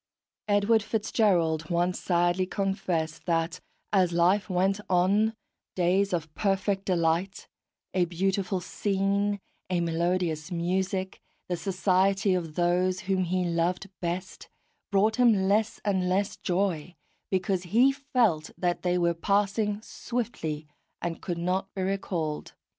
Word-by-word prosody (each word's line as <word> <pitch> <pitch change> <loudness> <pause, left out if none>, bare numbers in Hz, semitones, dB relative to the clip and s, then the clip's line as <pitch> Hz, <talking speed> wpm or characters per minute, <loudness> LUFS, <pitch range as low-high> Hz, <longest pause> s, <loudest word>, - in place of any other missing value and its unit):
Edward 205 +2 +3
FitzGerald 180 -8 +1
once 175 +1 +1
sadly 175 +1 +1
confessed 180 -6 -2
that, 165 +1 0 0.3
as 185 -3 +4
life 180 +3 +2
went 190 +2 +1
on, 200 +5 +3 0.4
days 185 +2 +2
of 165 -3 -2
perfect 195 0 0
delight 175 +2 0 0.5
a 185 -2 +3
beautiful 190 +2 -1
scene, 200 +1 0 0.3
a 180 -2 +1
melodious 170 -1 -1
music, 185 +2 -1 0.3
the 180 - +1
society 190 +1 +2
of 165 -4 -2
those 180 +2 +1
whom 190 -2 0
he 180 +1 0
loved 175 +3 -1
best 180 +2 -4 0.4
brought 210 +2 +3
him 220 -6 +4
less 215 +2 +1
and 190 -3 +1
less 195 +2 0
joy, 180 -3 -1 0.3
because 190 -1 0
he 235 +9 +4
felt 245 - +1
that 175 -1 0
they 180 0 +1
were 170 -1 +2
passing 205 +4 0
swiftly, 215 -15 -4 0.3
and 170 -1 -4
could 175 -2 -3
not 185 +3 -1
be 190 - -1
recalled. 180 -5 -2
185 Hz, 125 wpm, -27 LUFS, 175-200 Hz, 0.5 s, as